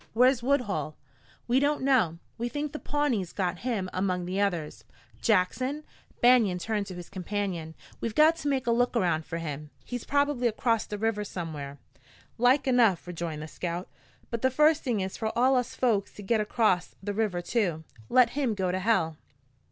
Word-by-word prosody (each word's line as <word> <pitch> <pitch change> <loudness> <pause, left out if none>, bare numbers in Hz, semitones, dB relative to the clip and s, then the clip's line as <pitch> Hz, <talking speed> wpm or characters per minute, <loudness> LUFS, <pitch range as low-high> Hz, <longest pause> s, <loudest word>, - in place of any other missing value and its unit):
Where's 250 +2 +4
Woodhull?" 210 - 0 0.5
"We 245 +2 +3
don't 290 0 +1
know. 235 -12 +3 0.2
We 240 +1 -1
think 295 +2 -3
the 300 - -6
Pawnees 255 - -1
got 180 -2 -1
him 225 -7 -2
among 185 -1 -1
the 185 +3 -1
others." 175 -7 -2 0.4
"Jackson" 255 +8 +1 0.4
Banion 235 -7 +5
turned 205 +2 -2
to 185 - -7
his 175 -1 -8
companion 185 -4 -4 0.2
"we've 230 -2 -3
got 310 +2 +6
to 305 - -4
make 270 -2 0
a 235 - +2
look 245 +1 +2
around 170 -6 +1
for 165 - -4
him. 150 -2 -5 0.2
He's 245 -2 -5
probably 285 -3 +1
across 230 0 0
the 210 - -4
river 215 0 0
somewhere." 155 -8 -6 0.6
"Like 250 +4 +4
enough," 235 -8 +3
rejoined 170 -3 -5
the - - -6
scout. 175 +2 -5 0.4
"But 230 -1 -2
the 260 - +3
first 300 +4 +4
thing 235 -7 -1
is 190 0 -4
for 220 0 -2
all 260 +2 +4
us 250 -1 -1
folks 220 -6 +1
to 205 - -9
git 220 +2 +2
acrost 210 -4 +1
the 205 +1 -2
river 205 -4 0
too. 175 -4 -1 0.3
Let 250 -2 +5
him 265 -6 0
go 185 -2 0
to 185 - -1
hell." 180 -7 +1
215 Hz, 185 wpm, -28 LUFS, 180-250 Hz, 0.6 s, got